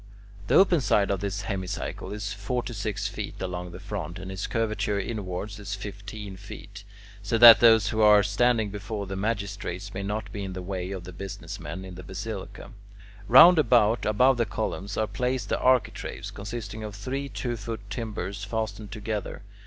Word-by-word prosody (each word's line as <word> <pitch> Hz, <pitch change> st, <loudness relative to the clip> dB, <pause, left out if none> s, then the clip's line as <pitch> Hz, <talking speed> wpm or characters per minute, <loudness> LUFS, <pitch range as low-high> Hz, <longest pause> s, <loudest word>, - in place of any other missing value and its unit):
The -, -, +3 dB
open 180 Hz, -5 st, +5 dB
side 100 Hz, -5 st, +2 dB
of 100 Hz, -, 0 dB
this 100 Hz, 0 st, -3 dB
hemicycle 95 Hz, -2 st, -4 dB
is 105 Hz, -1 st, -4 dB
forty 120 Hz, +5 st, -3 dB
six 100 Hz, -1 st, -2 dB
feet 105 Hz, -1 st, -6 dB
along 90 Hz, -1 st, -4 dB
the 85 Hz, -, -9 dB
front, 95 Hz, -3 st, -5 dB
and 95 Hz, 0 st, -7 dB
its 95 Hz, +1 st, -4 dB
curvature 105 Hz, -3 st, -1 dB
inwards 100 Hz, -1 st, -4 dB
is 100 Hz, -1 st, -4 dB
fifteen 100 Hz, 0 st, -8 dB
feet, 100 Hz, 0 st, -10 dB, 0.4 s
so 105 Hz, +3 st, 0 dB
that 115 Hz, -2 st, +11 dB
those 115 Hz, -2 st, +6 dB
who 110 Hz, -, 0 dB
are 105 Hz, -1 st, +7 dB
standing 110 Hz, +1 st, +2 dB
before 105 Hz, 0 st, -5 dB
the 95 Hz, 0 st, -5 dB
magistrates 100 Hz, -2 st, -3 dB
may 100 Hz, -, -4 dB
not 105 Hz, +1 st, -3 dB
be 100 Hz, 0 st, -5 dB
in 95 Hz, -1 st, -5 dB
the 90 Hz, 0 st, -6 dB
way 90 Hz, -1 st, -4 dB
of 95 Hz, -2 st, -5 dB
the 90 Hz, +1 st, -9 dB
business 95 Hz, +2 st, -7 dB
men 95 Hz, -, -6 dB
in 95 Hz, -, -9 dB
the 90 Hz, -, -9 dB
basilica. 100 Hz, +2 st, -7 dB, 0.6 s
Round 160 Hz, +8 st, +9 dB
about, 120 Hz, -4 st, +4 dB
above 125 Hz, +5 st, +4 dB
the 115 Hz, -2 st, +1 dB
columns, 105 Hz, -2 st, -3 dB
are 110 Hz, -, +2 dB
placed 125 Hz, +2 st, -2 dB
the -, -, 0 dB
architraves, 130 Hz, -3 st, 0 dB
consisting 110 Hz, +1 st, -6 dB
of 105 Hz, -1 st, -6 dB
three 135 Hz, +7 st, -4 dB
two 120 Hz, -3 st, -3 dB
foot 110 Hz, -1 st, -6 dB
timbers 105 Hz, -3 st, -4 dB
fastened 110 Hz, 0 st, -4 dB
together. 105 Hz, -2 st, -4 dB
105 Hz, 180 wpm, -27 LUFS, 100-110 Hz, 0.6 s, that